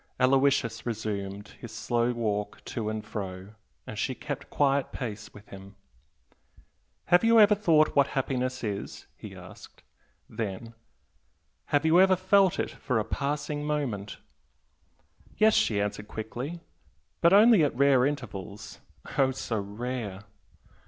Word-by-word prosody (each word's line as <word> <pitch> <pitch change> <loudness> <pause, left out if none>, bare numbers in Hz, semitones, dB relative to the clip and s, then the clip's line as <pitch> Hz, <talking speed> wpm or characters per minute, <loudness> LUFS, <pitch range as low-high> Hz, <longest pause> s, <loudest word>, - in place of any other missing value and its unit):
Aloysius 130 -3 +2
resumed 105 -3 -4
his 120 - -9
slow 120 +1 0
walk 105 -3 -3
to 110 -3 -3
and 110 0 -4
fro, 95 0 -6 0.3
and 110 - -7
she 130 - -1
kept 145 +1 -6
quiet 140 -1 +1
pace 105 -4 -6
with 105 0 -15
him. 95 +1 -12 1.4
"Have 175 - +6
you 230 0 +6
ever 210 0 +7
thought 165 -7 +3
what 140 -1 +5
happiness 130 -2 -2
is?" 100 -3 -5
he - - -10
asked, - - -13 0.4
then 115 +1 -5 0.9
"Have 145 +1 +1
you 160 +2 +5
ever 190 0 +5
felt 190 0 +3
it - - -2
for 125 - -2
a 110 - 0
passing 145 +1 -3
moment?" 135 -10 -3 1.2
"Yes" 215 0 +5
she 105 -3 +2
answered 105 0 -3
quickly 125 +11 -6 0.6
"But 170 - +5
only 210 -2 +7
at 145 - 0
rare 135 -1 +4
intervals 110 -8 -5 0.4
oh 135 -1 +5
so 125 -4 -3
rare!..." 105 -1 -5
125 Hz, 130 wpm, -28 LUFS, 105-145 Hz, 1.4 s, ever